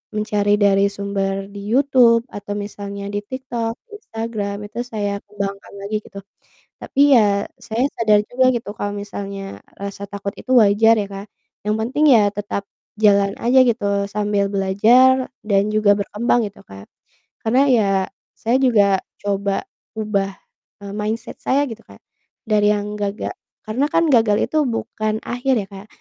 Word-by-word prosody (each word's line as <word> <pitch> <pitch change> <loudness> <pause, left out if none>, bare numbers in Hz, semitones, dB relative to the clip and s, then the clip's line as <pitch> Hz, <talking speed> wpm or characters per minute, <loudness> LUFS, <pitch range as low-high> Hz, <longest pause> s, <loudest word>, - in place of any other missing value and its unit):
mencari 210 -1 +1
dari 200 -1 +3
sumber 195 0 -3
di 200 - -8
YouTube 245 -2 +4
atau 205 0 -6
misalnya 200 -1 -6
di 205 - -1
TikTok, 235 0 -4 0.2
Instagram 225 - -5 0.2
itu - - -6
saya 205 -3 -3
kembangkan 200 -1 -6
lagi, 210 +2 -3
gitu. 200 -1 -11 0.6
Tapi 275 - -6 0.2
ya, 200 -1 +2 0.2
saya 230 +3 -2
sadar 215 -2 +4
juga 255 +1 +2
gitu, 225 -3 -4
kalau 205 0 -3
misalnya 200 -1 -6 0.2
rasa 200 0 -7
takut 200 0 -4
itu 260 - -6
wajar 225 0 +5
ya 205 -2 -1
Kak, 195 +1 -7 0.4
yang 210 - +2
penting 265 +7 +1
ya 205 -2 +4
tetap, 205 -1 -4 0.3
jalan 200 -2 +3
aja 255 +2 +5
gitu, 200 -3 0
sambil 205 -1 0
belajar 225 +7 +4 0.2
dan 200 -1 +2
juga 210 -1 +4
berkembang 220 +2 0
gitu 200 - -14
Kak. 95 0 -13 0.6
Karena, 250 +4 +3
ya 220 -5 +4 0.5
saya 235 +3 +1
juga 205 -7 +4 0.2
coba 200 -1 -1 0.3
ubah, 200 -2 -1 0.5
eee, 200 - -7
mindset 215 +3 -4
saya 280 +2 +1
gitu 225 0 -8
Kak, - - -17 0.4
dari 210 -2 +2
yang 210 0 -4
gaga 205 +1 -3 0.4
karena 250 +7 0
kan 335 0 +2
gagal 220 -3 +4
itu 310 - -5 0.2
bukan 215 -1 -2
akhir 250 +2 0
ya - - -9
Kak, 195 +2 -10
205 Hz, 150 wpm, -20 LUFS, 200-230 Hz, 0.6 s, wajar